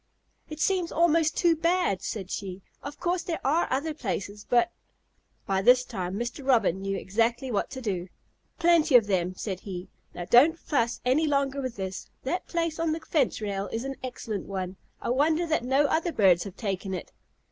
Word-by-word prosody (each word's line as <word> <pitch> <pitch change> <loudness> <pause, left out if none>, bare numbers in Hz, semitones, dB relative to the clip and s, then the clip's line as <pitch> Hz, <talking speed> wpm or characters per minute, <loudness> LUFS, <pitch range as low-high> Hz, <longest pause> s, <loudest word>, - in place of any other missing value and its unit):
"It 305 0 -7
seems 360 0 +1
almost 330 -1 +3
too 340 -2 +4
bad," 335 - +1
said 195 -4 -5
she. 190 -1 -5 0.2
"Of 285 +1 -8
course 355 0 0
there 340 -3 -3
are 310 +6 +2
other 290 +5 -1
places, 205 -5 -4
but 245 +8 +3 0.4
" - - -43
By 195 -1 +1
this 250 +4 +6
time 185 0 -4
Mr. 240 +6 -4
Robin 225 -8 +2
knew 195 0 -2
exactly 235 +7 0
what 205 - 0
to 260 - -7
do. 185 -5 -2 0.5
"Plenty 335 -4 +4
of 235 -4 +8
them," 185 -2 0
said 190 -1 -4
he. 190 -1 -7 0.3
"Now 175 - -5
don't 280 - +6
fuss 235 -8 -1
any 285 +6 +3
longer 280 -1 +1
with 255 -3 -4
this. 190 -1 -5
That 350 +8 -2
place 335 -2 -1
on 330 -1 +1
the 320 - -3
rail 210 -9 0
fence - - -11
is 230 - -2
an 270 0 -3
excellent 225 -5 -5
one. 185 -1 -4 0.3
I - - -2
wonder 310 +6 +2
that 315 -6 0
no 270 +4 +3
other 330 +4 +1
birds 185 - +4
have 195 -1 -9
taken 195 -2 -3
it." 180 - -7
245 Hz, 190 wpm, -27 LUFS, 195-315 Hz, 0.5 s, of